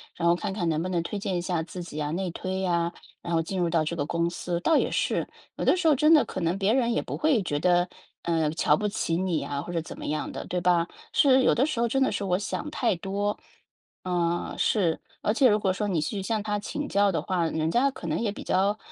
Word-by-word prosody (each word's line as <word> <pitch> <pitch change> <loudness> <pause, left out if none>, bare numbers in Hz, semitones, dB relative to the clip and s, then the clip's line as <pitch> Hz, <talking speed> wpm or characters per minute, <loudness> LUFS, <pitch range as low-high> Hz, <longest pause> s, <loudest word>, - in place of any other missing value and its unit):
然 170 - 0
后 170 - +5
看 200 +3 -3
看 190 -3 -2
能 160 -1 +1
不 180 - -3
能 175 -2 0
推 205 - -4
荐 195 -2 -2
一 - - -1
下 175 -2 -1
自 180 +2 -7
己 155 -3 -6
啊、 150 0 -2
内 185 +3 -2
推 185 +2 -4
呀， 170 -2 +1 0.3
然 170 - -4
后 165 - +3
进 185 +4 -4
入 175 -1 +1
到 165 -1 +2
这 170 - -2
个 145 -4 -1
公 170 +2 0
司。 175 0 -3
倒 315 - +3
也 - - +2
是， - - 0 0.3
有 - - -4
的 - - +4
时 350 -2 +1
候， 305 - +6
真 305 +4 +5
的 305 - +6
可 185 - -5
能 170 +2 0
别 200 +2 +2
人 240 -2 +2
也 - - +1
不 - - -5
会 295 -8 +3
觉 145 -5 -1
得， 175 +1 +3 0.4
呃， 165 -2 +1
瞧 155 -2 +3
不 210 - -3
起 200 -5 -1
你 180 -3 0
啊， 140 -1 -3
或 175 - -7
者 170 -1 -1
怎 160 - -9
么 - - -7
样 155 - -2
的， - - -6
对 180 - -1
吧？ 175 -1 +2 0.3
是， 265 -2 +5
有 - - +4
的 255 - +3
时 305 -6 -2
候 235 - +3
真 270 +4 0
的 - - +1
是 - - -2
我 180 -2 +1
想 300 +8 -4
太 235 -8 +1
多， 200 +3 -2 0.7
呃， 175 -1 -1
是。 175 -7 +1 0.2
而 210 - +1
且 260 +3 +5
如 210 0 +3
果 195 -2 +1
说 205 +3 -2
你 180 -5 0
去 195 +6 -3
向 215 +2 -1
他 210 -1 -1
请 290 +8 -4
教 200 0 +3
的 170 - -1
话， 180 -3 0
人 160 0 -1
家 270 +6 +3
可 175 - -8
能 155 0 -1
也 225 -3 0
比 - - -8
较 200 +3 +1
185 Hz, 290 characters per minute, -27 LUFS, 170-210 Hz, 0.7 s, 候